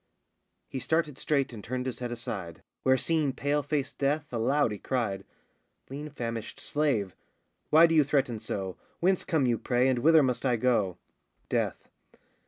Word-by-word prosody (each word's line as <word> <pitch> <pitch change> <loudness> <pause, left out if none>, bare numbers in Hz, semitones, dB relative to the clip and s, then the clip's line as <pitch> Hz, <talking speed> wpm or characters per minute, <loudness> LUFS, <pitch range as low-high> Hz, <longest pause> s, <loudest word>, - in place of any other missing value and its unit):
[He 135 - -5
started 155 -1 0
straight 140 -4 0
and 105 -3 -8
turned 125 +1 -3
his 130 - -4
head 120 -1 -4
aside, 100 -8 -6 0.2
Where 130 0 +4
seeing 155 -2 +2
pale 145 +2 0
faced 140 -2 -3
Death, 145 0 0
aloud 120 +2 +2
he 105 - -5
cried], 115 -7 -2 0.7
Lean 145 +2 -5
famished 115 -3 -5
slave! 135 - 0 0.5
why 160 +2 +8
do 165 - +2
you 155 -2 +6
threaten 135 -5 0
so, 95 -4 -4 0.2
Whence 185 +1 +2
come 160 -7 +1
you, 120 -2 +1
pray, 125 +1 +2
and 130 -2 +2
whither 160 +3 +6
must 125 -2 0
I 125 -3 +2
go? 110 -6 +1 0.5
DEATH. - - -1
130 Hz, 165 wpm, -29 LUFS, 115-150 Hz, 0.7 s, why